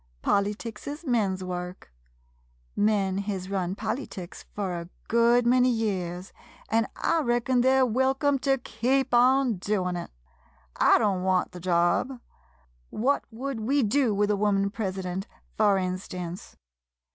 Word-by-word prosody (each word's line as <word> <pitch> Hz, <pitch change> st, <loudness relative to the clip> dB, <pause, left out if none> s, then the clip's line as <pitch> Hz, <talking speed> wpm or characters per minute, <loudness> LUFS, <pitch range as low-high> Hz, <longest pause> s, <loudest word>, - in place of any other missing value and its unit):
Polyticks 210 Hz, +2 st, -1 dB
is 295 Hz, +4 st, -6 dB
men's 200 Hz, -8 st, 0 dB
work. 180 Hz, -, -6 dB, 0.8 s
Men 200 Hz, -2 st, +1 dB
hez 195 Hz, -2 st, -4 dB
run 185 Hz, -1 st, -1 dB
polyticks 215 Hz, -5 st, -5 dB
fur 185 Hz, -4 st, -2 dB
a 170 Hz, -, -11 dB, 0.2 s
good 235 Hz, +1 st, +4 dB
many 250 Hz, +1 st, +4 dB
years, 190 Hz, -6 st, -2 dB, 0.4 s
an' 225 Hz, +1 st, +2 dB
I 330 Hz, -, +1 dB
reckon 240 Hz, -1 st, +1 dB
they 260 Hz, +1 st, +4 dB
're 260 Hz, -, +5 dB
welcome 265 Hz, +4 st, +1 dB
to 270 Hz, 0 st, +2 dB
keep 255 Hz, +3 st, -1 dB
on 250 Hz, -1 st, +4 dB
doin' 180 Hz, -1 st, -1 dB
it. 175 Hz, -, -5 dB, 0.7 s
I -, -, +5 dB
don't 195 Hz, -3 st, +1 dB
want 185 Hz, -1 st, +1 dB
the 180 Hz, -, -9 dB
job. 175 Hz, +9 st, +1 dB, 0.7 s
What 265 Hz, +6 st, 0 dB
would 255 Hz, +2 st, -5 dB
we 265 Hz, +5 st, +1 dB
do 250 Hz, +2 st, +2 dB
with 205 Hz, +1 st, +1 dB
a -, -, +2 dB
woman 200 Hz, -1 st, +1 dB
president, 190 Hz, -3 st, -4 dB, 0.3 s
fur 205 Hz, -2 st, +3 dB
instance 185 Hz, -1 st, -5 dB
210 Hz, 135 wpm, -27 LUFS, 185-250 Hz, 0.8 s, re